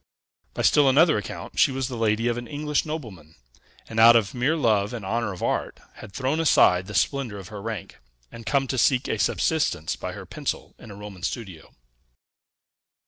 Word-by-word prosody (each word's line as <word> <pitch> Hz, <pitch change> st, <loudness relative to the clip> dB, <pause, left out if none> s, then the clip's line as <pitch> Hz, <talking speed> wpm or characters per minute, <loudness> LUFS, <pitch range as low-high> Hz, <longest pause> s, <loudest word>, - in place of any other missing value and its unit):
By -, -, -2 dB
still 145 Hz, -2 st, +5 dB
another 155 Hz, +4 st, +5 dB
account 100 Hz, -, -7 dB
she -, -, +5 dB
was 130 Hz, -1 st, -2 dB
the 130 Hz, -, -6 dB
lady 115 Hz, 0 st, +1 dB
of 120 Hz, -, +1 dB
an 120 Hz, 0 st, -6 dB
English 150 Hz, 0 st, -2 dB
nobleman; 100 Hz, -, -7 dB, 0.5 s
and, 110 Hz, -, -3 dB
out 115 Hz, +1 st, +8 dB
of 105 Hz, -5 st, +2 dB
mere 130 Hz, +6 st, +1 dB
love 110 Hz, -6 st, +1 dB
and 110 Hz, -5 st, -7 dB
honor 115 Hz, +1 st, -1 dB
of 90 Hz, -, -7 dB
art, -, -, -2 dB, 0.2 s
had 110 Hz, -, -11 dB
thrown 130 Hz, +9 st, -1 dB
aside 90 Hz, -, +4 dB
the 105 Hz, -, -7 dB
splendor 130 Hz, -3 st, 0 dB
of 95 Hz, 0 st, -10 dB
her 105 Hz, -2 st, -8 dB
rank, 110 Hz, -3 st, -6 dB, 0.3 s
and 115 Hz, -, -10 dB
come 135 Hz, +4 st, +1 dB
to 130 Hz, -, -1 dB
seek 130 Hz, +2 st, +2 dB
a -, -, -2 dB
subsistence 145 Hz, -, 0 dB
by -, -, -6 dB
her -, -, -9 dB
pencil -, -, -5 dB
in -, -, -12 dB
a 100 Hz, -, -9 dB
Roman 100 Hz, -2 st, -10 dB
studio. 95 Hz, -6 st, -6 dB
115 Hz, 195 wpm, -24 LUFS, 100-135 Hz, 0.5 s, out